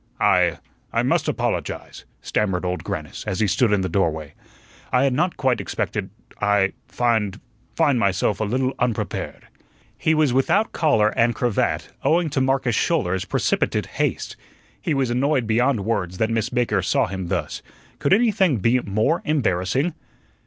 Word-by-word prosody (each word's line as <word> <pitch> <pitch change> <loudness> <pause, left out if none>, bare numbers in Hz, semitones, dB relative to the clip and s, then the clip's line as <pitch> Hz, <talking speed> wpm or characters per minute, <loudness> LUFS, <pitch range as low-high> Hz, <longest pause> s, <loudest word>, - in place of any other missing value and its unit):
"I - - +3 0.3
I - - +1
must - - +1
apologize," - - -3 0.2
stammered 95 -4 -1
Old 90 0 -2
Grannis, - - -5
as 95 - -2
he 110 - +3
stood 110 +3 +2
in 105 -2 +2
the 95 - -1
doorway. 80 -5 -1 0.6
"I 125 +1 +3
had 135 -2 +2
not 175 +7 0
quite 130 -3 +1
expected - - -3 0.3
I 105 -2 +2
find 110 -4 0 0.4
find 145 -6 +3
myself 100 0 +1
a - - 0
little 130 +5 0
unprepared." 120 -3 -3 0.5
He 160 - +1
was 150 -5 +2
without 195 - +2
collar 125 -10 +3
and 115 +1 +1
cravat, 120 -4 0
owing 165 -1 +2
to 135 - 0
Marcus 135 -2 +1
Schouler's 95 - 0
precipitate - - 0
haste. - - -2 0.5
He 155 - -1
was 130 -3 0
annoyed 130 +1 +1
beyond 115 -1 +1
words 95 -6 -1
that 110 +2 0
Miss 115 -2 0
Baker 120 -5 +1
saw 90 - +2
him 95 -2 -5
thus. - - -3 0.4
Could - - 0
anything 195 - +3
be 115 +5 +2
more 110 +9 0
embarrassing? 130 - 0
120 Hz, 155 wpm, -22 LUFS, 100-135 Hz, 0.6 s, I